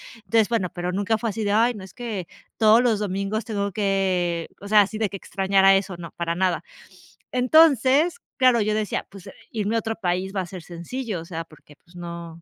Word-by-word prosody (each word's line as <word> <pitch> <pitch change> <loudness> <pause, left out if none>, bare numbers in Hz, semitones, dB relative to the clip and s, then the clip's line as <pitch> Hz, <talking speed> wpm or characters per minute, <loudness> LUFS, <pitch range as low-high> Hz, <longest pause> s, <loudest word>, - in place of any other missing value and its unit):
entonces, 220 0 +1
bueno, 225 -6 0
pero 175 +1 -3
nunca 205 +3 0
fue 225 -1 -2
así 220 +2 -4
de: 205 - 0
"Ay, 230 +4 +3
no, 205 -4 -9
es 190 - -12
que 220 -8 -5 0.3
todos 220 +1 +6
los 235 -4 +2
domingos 200 +2 -2
tengo 200 -3 -3
que...", 185 -5 0
o 200 - -8
sea, 215 0 +6
así 210 +2 -2
de 215 -2 0
que 195 - -6
extrañara 195 0 +3
eso, 195 -2 -2
no, 170 -2 -9
para 170 -1 -3
nada, 180 -4 0 0.7
entonces, 285 - +4 0.2
claro, 255 -3 +4
yo 210 0 +1
decía: 215 -1 -2
"Pues 195 -2 -12 0.2
irme 215 0 -1
a - - +3
otro 225 0 -3
país 185 0 -2
va - - 0
a - - -5
ser 180 -2 -9
sencillo", 180 +5 -5
o 165 - -10
sea, 165 -2 -5
porque, 155 -2 -19
pues, 175 0 -22
no 170 -1 -8
200 Hz, 215 wpm, -24 LUFS, 180-225 Hz, 0.7 s, todos